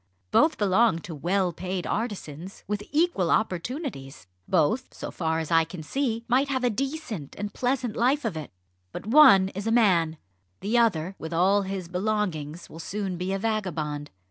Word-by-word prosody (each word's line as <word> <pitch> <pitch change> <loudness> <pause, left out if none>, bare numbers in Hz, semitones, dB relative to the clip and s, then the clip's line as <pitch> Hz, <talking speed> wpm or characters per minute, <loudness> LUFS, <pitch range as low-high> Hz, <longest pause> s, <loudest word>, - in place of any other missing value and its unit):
Both 310 +1 +4
belong 205 0 +3
to 165 - -8
well 180 +4 0
paid 185 +1 -4
artisans 190 -6 -4
with 205 0 -2
equal 300 - +2
opportunities. 190 - -2 0.2
Both, 190 - +1
so - - -6
far 160 -2 -1
as 160 -1 -3
I 165 0 +5
can 160 0 -8
see, 230 - -2
might 260 +4 +3
have 260 -2 -1
a 245 - +3
decent 265 - -4
and 205 0 -4
pleasant 250 -3 -1
life 260 +4 +2
of 210 -7 -1
it. 155 -1 -6 0.4
But - - -7
one 225 -7 +7
is 200 +3 -5
a - - +2
man 175 -9 +3 0.4
the 210 +5 -1
other, 195 -6 +2
with 160 +1 -6
all 190 +4 +3
his 190 -2 -4
belongings, 180 -5 -2
will 160 - -11
soon 195 +1 -3
be 180 +2 -3
a 195 - 0
vagabond. 165 -9 -2
195 Hz, 170 wpm, -26 LUFS, 165-230 Hz, 0.4 s, one